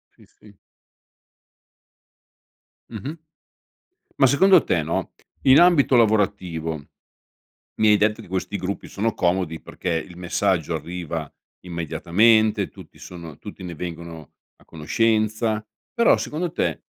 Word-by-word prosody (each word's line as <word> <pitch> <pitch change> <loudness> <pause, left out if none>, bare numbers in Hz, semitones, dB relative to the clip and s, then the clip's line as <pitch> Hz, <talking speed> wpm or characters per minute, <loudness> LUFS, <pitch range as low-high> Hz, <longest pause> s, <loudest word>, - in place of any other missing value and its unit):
Sì, - - -20
sì. 105 -2 -21 2.3
Mh-mh. 150 +5 -6 1.0
Ma 135 - +7
secondo 180 +7 +5
te, 85 - +1
no, 80 +2 -3 0.3
in 135 +2 +7
ambito 170 -7 +5
lavorativo, 100 -8 +1 1.0
mi 110 - +3
hai 105 - +6
detto 105 +1 +1
di - - -14
questi 95 +3 -3
gruppi, 100 +1 -5
sono 110 +2 -2
comodi 85 -3 -1
perché - - -6
il 85 +2 -4
messaggio 90 -2 0
arriva 80 -1 -5 0.3
immediatamente, 105 +6 +2
tutti - - -15
sono 85 -4 -10
tutti 105 -1 -11
ne 90 -2 -6
vengono 85 -2 -8 0.2
a - - -25
conoscenza, 110 +6 0 0.3
però, 235 -2 +4
secondo 165 +3 -3
te, - - -2
95 Hz, 115 wpm, -23 LUFS, 85-110 Hz, 2.3 s, Ma